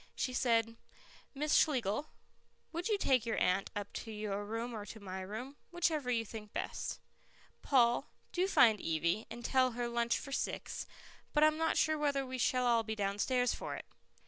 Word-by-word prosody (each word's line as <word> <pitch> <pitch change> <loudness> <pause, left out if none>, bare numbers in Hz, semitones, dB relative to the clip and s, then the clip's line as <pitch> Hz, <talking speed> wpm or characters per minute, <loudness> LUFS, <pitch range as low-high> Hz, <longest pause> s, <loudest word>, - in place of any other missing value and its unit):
She 255 - -1
said, 230 -2 +2 0.6
"Miss 300 +2 0
Schlegel, 255 -2 +2 0.6
would 340 +1 -3
you 430 -2 +2
take 260 - +3
your 230 -1 -1
aunt 185 +2 +2
up 205 -1 -4
to - - -6
your 210 -1 -3
room 230 +3 -3
or 215 -2 -5
to 215 +2 -9
my 190 -2 -6
room, 235 +9 -6
whichever 325 -6 0
you 230 -2 +1
think 210 -1 -9
best. - - -3 0.6
Paul, 240 -4 +3 0.2
do 365 +1 +1
find 225 - +5
Evie, 170 +6 0
and 240 +1 -8
tell 255 -2 +3
her 240 0 -2
lunch 235 0 +1
for 275 - -8
six, - - -3 0.5
but 300 - +4
I'm 310 0 +4
not 325 0 +1
sure 310 -1 +2
whether 285 -2 +1
we 255 0 -5
shall 250 +1 +2
all 235 -1 +4
be 220 0 -4
downstairs 210 +5 +1
for - - -5
it." - - -8
235 Hz, 180 wpm, -34 LUFS, 215-275 Hz, 0.6 s, find